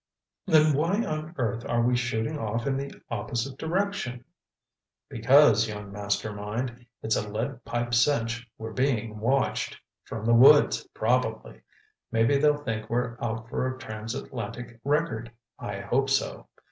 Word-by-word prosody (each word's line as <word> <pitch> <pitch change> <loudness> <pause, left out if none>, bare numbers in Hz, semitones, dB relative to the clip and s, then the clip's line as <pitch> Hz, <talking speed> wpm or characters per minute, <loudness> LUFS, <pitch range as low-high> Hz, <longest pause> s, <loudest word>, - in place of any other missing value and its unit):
'" - - -63
"Then 155 -3 +5
why 170 +10 +1
on 155 +2 -4
earth 115 -2 -1
are 120 0 +2
we 125 +1 +3
shooting 125 +4 -1
off 115 +1 -2
in 140 -1 +1
the 140 +1 -4 0.2
opposite 120 +4 -3
direction?" 160 -8 -2 0.8
"Because, 115 -2 +5
young 105 -1 -7
Master 105 +1 -2
Mind, 120 +4 -5 0.2
it's 110 - +1
a 105 - -2
lead 120 +4 -4
pipe 120 +1 -2
cinch 120 -2 +1
we're 110 0 -6
being 115 -5 0
watched—from 115 -2 -2
the 115 - +4
woods, 130 -2 +6
probably. 110 -1 0 0.5
Maybe 115 +5 +3
they'll 150 0 +4
think 110 -4 -3
we're 120 0 -1
out 115 -1 -3
for 130 +1 -1
a 130 0 -4
transatlantic 115 0 -6
record—I 115 -8 -3
hope 135 +7 +1
so. 135 0 -1
120 Hz, 140 wpm, -27 LUFS, 110-135 Hz, 0.8 s, woods